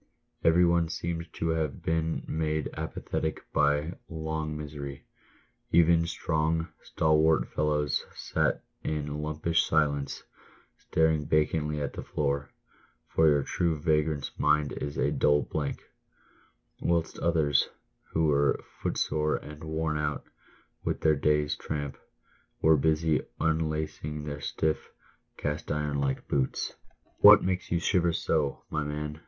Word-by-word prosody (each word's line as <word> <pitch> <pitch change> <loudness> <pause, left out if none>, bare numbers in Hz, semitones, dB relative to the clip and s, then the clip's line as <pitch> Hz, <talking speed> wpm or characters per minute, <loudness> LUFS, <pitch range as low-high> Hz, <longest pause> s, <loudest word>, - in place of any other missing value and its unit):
Every 85 +2 +5
one 85 -1 +2
seemed 85 0 -4
to 80 - -2
have 80 -3 -1
been 80 0 0
made 80 -1 -1
apathetic 80 0 -3
by 75 +3 +1
long 80 -1 -3
misery; 70 -2 -7 0.7
even 85 0 +5
strong, 80 0 0
stalwart 80 -3 +2
fellows 75 -1 +1
sat - - 0 0.2
in 75 -1 -2
lumpish 75 +2 +1
silence, 70 -3 0 0.5
staring 80 -2 +1
vacantly 75 0 +1
at 70 -2 -3
the - - -5
floor 70 -1 -1 0.6
(for 80 - +4
your 70 -2 +3
true 85 -1 0
vagrant's 75 -2 +1
mind 75 -1 +3
is 70 0 -5
a - - +1
dull 75 0 +3
blank); 75 -3 -3 1.0
whilst 85 -1 0
others, 80 -4 +2 0.4
who 80 0 +2
were 70 -2 +3 0.2
footsore 75 0 0
and 75 +1 -8
worn 80 -1 -1
out 75 -1 -2 0.6
with - - -2
their 80 -1 +4
day's 75 +1 +2
tramp, 75 -2 -4 0.6
were 80 0 +5
busy 80 +1 +2 0.2
unlacing 80 -1 -1
their 75 -1 -5
stiff, 80 +2 -1 0.5
cast 75 +1 -3
iron 75 -1 -1
like 70 -1 -1
boots. 65 -2 -1 0.2
" - - -38
What - - +10
makes 95 -1 -2
you 85 - +3
shiver 85 -1 +2
so, 75 -4 0
my 75 - 0
man 75 +1 -4
75 Hz, 125 wpm, -28 LUFS, 75-80 Hz, 1.0 s, What